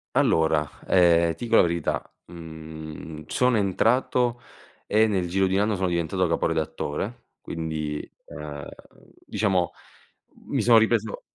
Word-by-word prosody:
Allora, 80 -2 +3 0.2
ehm, 85 -2 +4
ti - - -7
dico 115 -1 +3
la - - +8
verità, 85 -2 -2 0.2
mhmm, 80 -1 -9
sono 125 +3 +2
entrato, 120 +4 +1 0.5
e 110 +1 +3
nel 95 -4 0
giro 95 +2 +2
di 95 - 0
un 100 - +3
anno 105 0 +1
sono 95 0 0
diventato 85 +1 0
capo 85 - 0
redattore, 80 +5 -3
quindi, 80 -2 -4 0.3
uhm, 75 -1 -8 0.6
diciamo, 95 -4 0 0.8
mi - - 0
sono 120 -1 +6
ripreso 110 -1 +1
85 Hz, 130 wpm, -25 LUFS, 80-105 Hz, 0.8 s, la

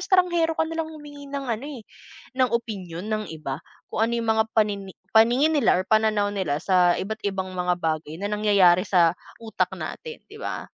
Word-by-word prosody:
estanghero 345 -3 +2
ka - - +2
nalang 325 0 -3
humingi 290 -2 -11
ng 280 0 -4
ano, 230 +4 -3
eh, 280 -6 -8 0.6
ng 255 -1 +4
opinyon 195 -6 -4
ng 215 0 -1
iba 140 -3 -5 0.3
kung - - -3
ano 235 - -3
yung 230 -1 -3
mga 220 - +4
panini 200 -3 0 0.2
paningin 240 +8 +5
nila 290 - +3
or 185 - -1
pananaw 215 -2 +2
nila 185 -8 -1
sa 180 -2 +4
iba't 215 +3 -4
ibang 190 -1 -2
mga 180 -1 0
bagay 155 -2 -2
na 200 - -3
nangyayari 200 -3 +4
sa 175 -3 +4 0.3
utak 220 - -1
natin, 470 -1 -7
di 435 - -11
ba? - - -4
215 Hz, 185 wpm, -24 LUFS, 185-275 Hz, 0.6 s, paningin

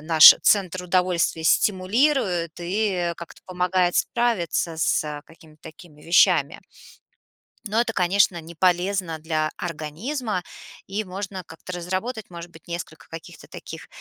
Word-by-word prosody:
наш 160 -1 +9
центр 185 -3 +2
удовольствия 180 -2 0
стимулирует 190 - +1
и, 200 +5 -1 0.2
э, - - -5
как-то 170 - -12
помогает 180 0 0
справиться 185 -8 0
с, 160 - +1
э, 150 -1 -6
какими-то 160 -2 -19
такими 155 -2 -14
вещами. 170 +3 +3 1.1
Но 215 +3 0
это, 225 -2 -2
конечно, 180 -1 +2
не 165 +1 -12
полезно 180 -1 0
для 155 -1 -1
организма, 180 - -4 0.4
и 205 +2 -3
можно 190 0 -6
как-то 165 +3 -11
разработать, 190 +6 -4
может 170 0 -10
быть, 160 0 -17
несколько 170 -2 -7
каких-то 165 -1 -11
таких - - -10
180 Hz, 130 wpm, -23 LUFS, 165-195 Hz, 1.1 s, наш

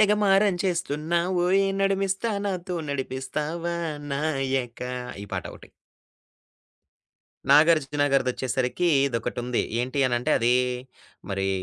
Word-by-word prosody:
తెగమారం 205 -2 +4
చేస్తున్నావోయ్ 175 +3 +1 0.2
నడుమిస్తా 195 +3 0
నాతో 180 -2 -3
నడిపిస్తావా 150 +5 -3 0.4
నాయకా 135 -4 -2 0.3
ఈ - - -12
పాటొకటి. - - -7 1.8
'నాగార్జున' 145 -1 +4
గారిదొచ్చేసరికి 130 +4 0 0.2
ఇదొకటి 120 -2 -3
ఉంది. 125 -1 0 0.2
ఏంటి 130 +3 -3
అని 120 -1 +1
అంటే 125 - -2
అదీ 120 +2 +3 0.8
మరీ 95 0 -1
150 Hz, 90 wpm, -25 LUFS, 130-180 Hz, 1.8 s, తెగమారం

